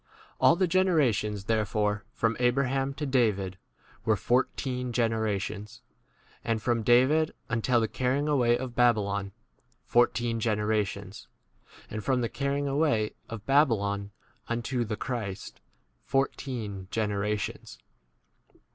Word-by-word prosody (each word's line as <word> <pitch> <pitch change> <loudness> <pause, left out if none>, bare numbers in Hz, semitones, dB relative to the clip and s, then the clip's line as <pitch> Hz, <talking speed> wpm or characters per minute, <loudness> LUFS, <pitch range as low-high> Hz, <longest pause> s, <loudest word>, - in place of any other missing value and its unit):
l? - - -27
All - - +6
the 185 +2 +2
generations, 140 - +2
therefore, 105 -1 0
from 115 0 0
Abraham 135 +2 +1
to 150 - -3
David 105 -8 +1 0.4
[were] 110 - +3
fourteen 125 +3 -1
generations; 110 -3 -2 0.6
and 115 -1 0
from 115 +1 0
David 130 +8 +4
until 120 +2 +2
the 110 - +1
carrying 130 +6 0
away 120 -5 +3
of 130 -1 -5
Babylon, 100 -5 +2 0.5
fourteen 120 -1 +2
generations; 105 -2 -1 0.6
and 110 -1 -5
from 130 +1 +1
the 115 - -1
carrying 140 +1 -1
away 140 -7 +1 0.2
of 115 -2 -7
Babylon 100 -8 +2 0.4
unto 120 +1 -1
the 110 -2 -4
Christ, 110 -6 -5 0.4
fourteen 120 -8 -2
generations. 105 -1 -2
115 Hz, 110 wpm, -28 LUFS, 105-130 Hz, 0.6 s, All